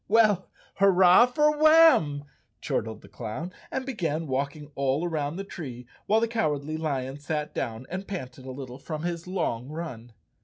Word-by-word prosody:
"W 220 - +4
ell, 195 -3 -2 0.3
hurrah 190 +3 +6
for 300 +4 +2
Warn!" 310 - +6 0.3
chortled 110 0 -3
the - - -13
clown, 130 +11 -6 0.2
and 265 - -3
began 165 - -2
walking 145 +2 -3
all 140 +4 0
around 155 -2 -2
the 195 - -4
tree, 130 -11 -8 0.2
while 215 +2 +4
the 230 - +1
Cowardly 155 -9 -1
Lion 140 -3 -3
sat 150 +1 -3
down 115 +2 -4
and 190 +2 -5
panted 130 -8 -7
a - - -5
little 130 -1 -8
from 155 +2 -5
his 170 0 -3
long 140 -9 -2
run. 130 -8 -7
155 Hz, 165 wpm, -27 LUFS, 135-190 Hz, 0.3 s, hurrah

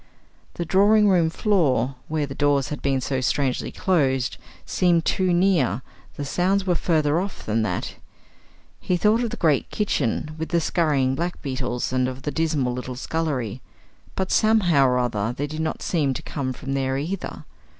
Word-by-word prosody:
The 170 - -3
drawing 205 +4 +4
room 175 -4 +3
floor, 150 - +1
where 155 -1 -1
the 135 - -7
doors 140 -1 +1
had 150 - -5
been 135 -1 0
so 130 +1 -1
strangely 130 0 0
closed, 135 -8 +1 0.3
seemed 175 -3 +2
too 185 -1 +1
near; 175 - +2 0.3
the 145 - -4
sounds 185 +7 +1
were 180 - +2
further 155 -2 +1
off 195 +2 -5
than 110 +1 0
that. 110 - -3 0.8
He 180 - 0
thought 215 +5 +3
of 235 - -1
the - - -6
great 155 -6 +2
kitchen, 155 - -1
with 160 - -3
the 170 - +2
scurrying 150 -6 +1
black 170 +6 -3
beetles, 130 -3 -2
and 130 0 +2
of 130 +1 -6
the 150 - -2
dismal 150 -5 0
little 125 0 -5
scullery; 130 -5 -2 0.5
but, 190 -1 -2
somehow 180 -11 +4
or 125 0 +2
other, 120 -2 -1
they 145 - -1
did 155 +2 -5
not 160 - -3
seem 145 -6 0
to - - -6
come 135 -3 -3
from 135 +2 -5
there 135 -1 0
either. 175 +7 -5
150 Hz, 175 wpm, -23 LUFS, 130-175 Hz, 0.8 s, drawing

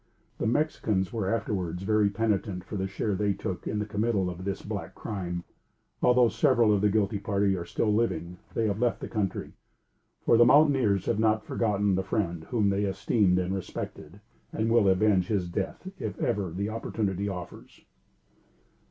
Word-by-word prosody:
The - - 0
Mexicans 110 - 0
were 100 -4 -1
afterwards 95 -6 -2
very 105 0 +3
penitent 100 -3 -1
for 100 - -7
the 95 -1 -1
share 100 +2 -2
they 100 +1 +1
took 95 -1 -5
in 105 - -2
the 105 - -1
committal 105 -3 0
of 90 +2 -8
this 100 -1 -3
black - - -5
crime. 90 -4 -4 0.6
Although 125 -1 +5
several 110 -2 +3
of 100 - +1
the 105 - +4
guilty 100 0 +1
party 100 -1 +1
are 85 -2 -4
still 105 +4 0
living, 90 -6 -1 0.2
they 115 - +1
have 105 -1 -1
left 120 -1 +1
the - - -6
country; 105 -4 -3 0.7
for, 115 - +5
the 120 - +8
mountaineers 130 - +4
have 110 - 0
not 110 -1 +2
forgotten 105 -3 +1
the 95 - +1
friend 90 -5 -2
whom 105 -2 +1
they 100 +1 0
esteemed 95 -1 +2
and 90 +1 0
respected, 95 -2 -6 0.3
and 110 +1 -1
will 115 -4 +5
avenge 95 -1 +3
his 100 -5 0
death 95 - -4
if 105 -3 -4
ever 100 -3 0
the 100 +5 -3
opportunity 100 -3 -2
offers. 90 -3 -9
100 Hz, 175 wpm, -28 LUFS, 95-110 Hz, 0.7 s, the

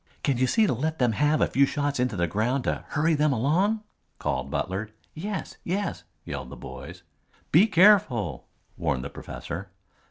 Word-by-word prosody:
"Can 135 -4 +1
you 130 - +3
see 220 - +4
to - - +1
let 155 +6 -2
them 125 -2 +3
have 150 +6 +2
a - - +4
few 140 +1 +3
shots 145 -2 -1
into 125 -3 +1
the 85 -2 +1
ground 115 - 0
to - - -2
hurry 160 +2 +1
them 150 0 +3
along?" 175 - +1 0.3
called 70 -2 -2
Butler. 95 +8 -2 0.2
"Yes, 195 +5 -5
yes," 175 - -2 0.2
yelled 65 -3 -5
the 70 - -8
boys. - - -9 0.5
"Be 180 +8 +6
careful," 160 - +4 0.3
warned 70 -6 -1
the 70 - -6
professor. 90 +3 -7
130 Hz, 170 wpm, -26 LUFS, -, 0.5 s, Be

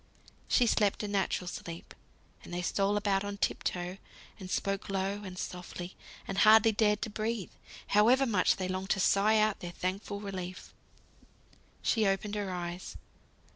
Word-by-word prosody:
She 245 - +4
slept 210 -2 +2
a - - -2
natural 195 -2 -1
sleep; 170 -1 -7 0.5
and - - -11
they 175 0 -3
stole 200 +3 +1
about 200 -1 +1
on 205 0 -4
tip - - 0
toe, 180 +1 -2 0.4
and 185 -2 -8
spoke 195 +1 -2
low, 195 +1 -1
and 185 -2 -8
softly, 180 0 -6 0.3
and 195 - -2
hardly 220 +1 +7
dared 210 -1 +2
to 220 - -4
breathe, 215 -1 -3 0.4
however 240 +6 +5
much 205 -7 +3
they 185 - -3
longed 185 +1 -3
to 195 - +2
sigh 205 +3 +4
out 215 -1 +2
their 175 - -6
thankful 195 +3 -3
relief. 185 -3 -6 1.1
She 220 -3 +2
opened 195 +2 0
her 205 -2 -2
eyes. 175 0 -5
195 Hz, 160 wpm, -31 LUFS, 185-210 Hz, 1.1 s, hardly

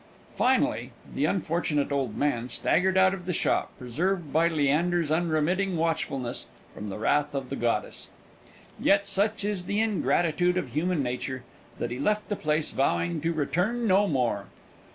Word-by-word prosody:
Finally, - - +1 0.2
the - - +1
unfortunate 160 -5 0
old 135 -6 -1
man 125 -4 0
staggered 185 +9 +2
out 190 0 +5
of 185 -2 -7
the 180 - 0
shop, - - 0
preserved 160 +6 -2
by 165 +2 +4
Leander's 160 +1 +1
unremitting 170 +3 +1
watchfulness 160 -6 -2 0.3
from 105 - -7
the 95 - -5
wrath 145 +6 +1
of 135 -2 -4
the - - -1
goddess. 115 -4 -2 0.7
Yet, 200 0 +3
such 200 +2 +1
is 200 -4 -2
the 205 +3 -1
ingratitude 180 -5 +1
of - - -2
human 165 0 0
nature, 125 +1 -4 0.3
that 120 - -3
he 125 - -4
left 210 +8 0
the 205 - 0
place 155 -3 -1
vowing 85 -10 0
to 165 - 0
return 180 +10 0
no 200 0 +4
more. 120 - 0
160 Hz, 155 wpm, -27 LUFS, 135-185 Hz, 0.7 s, out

